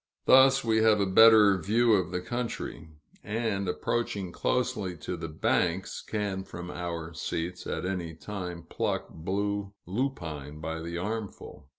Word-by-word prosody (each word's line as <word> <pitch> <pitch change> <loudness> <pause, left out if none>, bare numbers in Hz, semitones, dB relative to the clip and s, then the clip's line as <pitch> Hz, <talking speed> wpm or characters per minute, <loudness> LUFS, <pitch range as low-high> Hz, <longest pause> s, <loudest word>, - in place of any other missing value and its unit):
Thus 135 +1 +6
we 110 -1 +2
have 110 -1 +5
a 100 - +3
better 105 0 +7
view 115 +6 +3
of 95 -4 +2
the 90 0 -3
country; 115 -8 -4 0.3
and, 105 -3 -1
approaching 100 -3 -2
closely 110 -8 -1
to 90 - -4
the 80 -1 -5
banks, 85 +4 0
can 100 -3 -3
from 90 -1 -8
our 85 -1 -5
seats 85 +2 -4
at - - -3
any 90 -3 -3
time 90 -2 -6
pluck - - -2
blue 100 +3 -2
lupine 80 - -4
by 80 +1 -4
the 85 +1 -5
armful. 105 -6 -5
95 Hz, 145 wpm, -28 LUFS, 85-110 Hz, 0.3 s, better